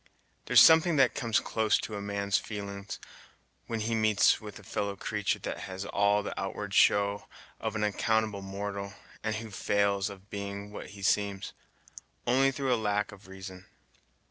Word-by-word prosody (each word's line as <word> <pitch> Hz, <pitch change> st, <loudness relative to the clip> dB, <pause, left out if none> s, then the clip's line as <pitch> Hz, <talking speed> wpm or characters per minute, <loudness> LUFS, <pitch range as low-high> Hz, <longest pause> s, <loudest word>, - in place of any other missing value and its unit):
There's -, -, +6 dB
something 160 Hz, +1 st, +7 dB
that 135 Hz, -3 st, +4 dB
comes 115 Hz, -2 st, +1 dB
close 110 Hz, -1 st, +1 dB
to 110 Hz, -, -5 dB
a 100 Hz, -, -4 dB
man's 100 Hz, -1 st, 0 dB
feelin's, 100 Hz, -1 st, -6 dB, 0.7 s
when 115 Hz, -1 st, -2 dB
he 115 Hz, +2 st, -1 dB
meets 110 Hz, -1 st, +4 dB
with 105 Hz, -1 st, -9 dB
a 105 Hz, -, -13 dB
fellow 100 Hz, +1 st, -3 dB
creatur' 105 Hz, +1 st, -1 dB
that -, -, -4 dB
has 95 Hz, +1 st, -5 dB
all 100 Hz, 0 st, +2 dB
the -, -, -4 dB
outward -, -, -4 dB
show 100 Hz, 0 st, +3 dB, 0.3 s
of 110 Hz, -1 st, -3 dB
an 105 Hz, -, 0 dB
accountable 110 Hz, 0 st, +1 dB
mortal, 100 Hz, +1 st, -5 dB, 0.3 s
and 110 Hz, 0 st, -1 dB
who 110 Hz, 0 st, -6 dB
fails 100 Hz, 0 st, +1 dB
of 100 Hz, 0 st, -13 dB
being 100 Hz, 0 st, -5 dB
what -, -, -7 dB
he 100 Hz, -, -9 dB
seems, 100 Hz, 0 st, 0 dB, 0.7 s
only 130 Hz, +3 st, +4 dB
through 135 Hz, -1 st, 0 dB
a -, -, +2 dB
lack 105 Hz, 0 st, 0 dB
of 100 Hz, -1 st, -14 dB
reason. 95 Hz, -1 st, -10 dB
100 Hz, 170 wpm, -30 LUFS, 100-110 Hz, 0.7 s, something